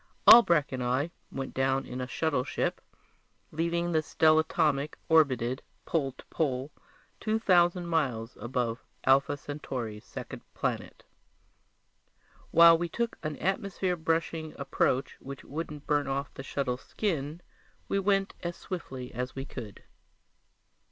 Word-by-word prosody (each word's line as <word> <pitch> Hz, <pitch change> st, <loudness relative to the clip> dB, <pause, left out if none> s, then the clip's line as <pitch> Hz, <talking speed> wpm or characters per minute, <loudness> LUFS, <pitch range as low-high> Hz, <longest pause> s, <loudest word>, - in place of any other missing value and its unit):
Albrecht 170 Hz, -11 st, +8 dB
and 130 Hz, -1 st, -3 dB
I 130 Hz, +7 st, 0 dB, 0.2 s
went 135 Hz, -1 st, -5 dB
down 135 Hz, 0 st, +1 dB
in 125 Hz, +1 st, -5 dB
a 125 Hz, -, -3 dB
shuttleship, 130 Hz, -1 st, -1 dB, 0.7 s
leaving 170 Hz, +2 st, 0 dB
the 160 Hz, -2 st, +3 dB
stellatomic 155 Hz, -2 st, +2 dB
orbited 130 Hz, -6 st, +3 dB, 0.2 s
pole 140 Hz, -5 st, 0 dB
to -, -, -15 dB
pole 135 Hz, -2 st, -1 dB, 0.5 s
two 220 Hz, 0 st, 0 dB
thousand 175 Hz, -4 st, +3 dB
miles 130 Hz, -9 st, -1 dB
above 120 Hz, -1 st, -2 dB, 0.2 s
Alpha 140 Hz, +2 st, +4 dB
Centauri's 125 Hz, -7 st, -5 dB
second -, -, -8 dB
planet. -, -, -3 dB, 1.5 s
While 165 Hz, 0 st, +8 dB
we 175 Hz, 0 st, -2 dB
took 235 Hz, +6 st, -2 dB
an 155 Hz, -2 st, -3 dB
atmosphere 190 Hz, -1 st, -1 dB
brushing 165 Hz, -1 st, -1 dB
approach 135 Hz, -1 st, 0 dB
which 140 Hz, 0 st, -8 dB
wouldn't 150 Hz, -1 st, -6 dB
burn 145 Hz, -2 st, +1 dB
off 140 Hz, +1 st, -2 dB
the -, -, -7 dB
shuttle's 135 Hz, -2 st, -2 dB
skin, 160 Hz, -6 st, -2 dB, 0.5 s
we 195 Hz, -, +1 dB
went 195 Hz, 0 st, +1 dB
as 175 Hz, 0 st, -3 dB
swiftly 130 Hz, -9 st, -6 dB
as 125 Hz, +2 st, -4 dB
we 135 Hz, 0 st, -4 dB
could. 110 Hz, -8 st, -9 dB
145 Hz, 125 wpm, -29 LUFS, 130-170 Hz, 1.5 s, Albrecht